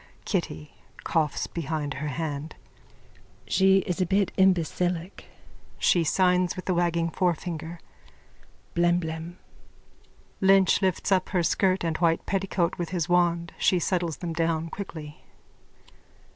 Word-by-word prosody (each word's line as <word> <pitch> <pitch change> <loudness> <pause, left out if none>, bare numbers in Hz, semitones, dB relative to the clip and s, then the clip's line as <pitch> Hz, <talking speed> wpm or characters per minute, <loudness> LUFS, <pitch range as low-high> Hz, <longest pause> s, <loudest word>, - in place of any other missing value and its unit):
_ - - -32
KITTY: 75 -1 -3 0.3
(Coughs 160 -3 0
behind 155 -3 -3
her 150 - -4
hand.) 150 +1 -4 0.9
She's 190 -2 +3
a - - +3
bit 195 +1 +1
imbecillic. 180 -1 +1 0.5
(She 175 - +3
signs 180 +2 +2
with 185 - -8
a 185 - +2
waggling 170 -1 +1
forefinger.) 170 -1 -2 0.9
Blemblem. 170 -1 0 1.1
_(Lynch 195 0 +5
lifts 190 0 0
up 185 -1 +2
her 180 -3 +1
skirt 185 +2 +1
and 165 -2 -1
white 165 -1 +1
petticoat 190 -3 -1
with 170 -2 -2
the 175 -3 -1
wand. 170 -1 +1
She 185 - +3
settles 175 -4 -1
them 170 -2 -4
down 165 0 -1
quickly.) 160 -6 -8
175 Hz, 120 wpm, -26 LUFS, 165-185 Hz, 1.1 s, Lynch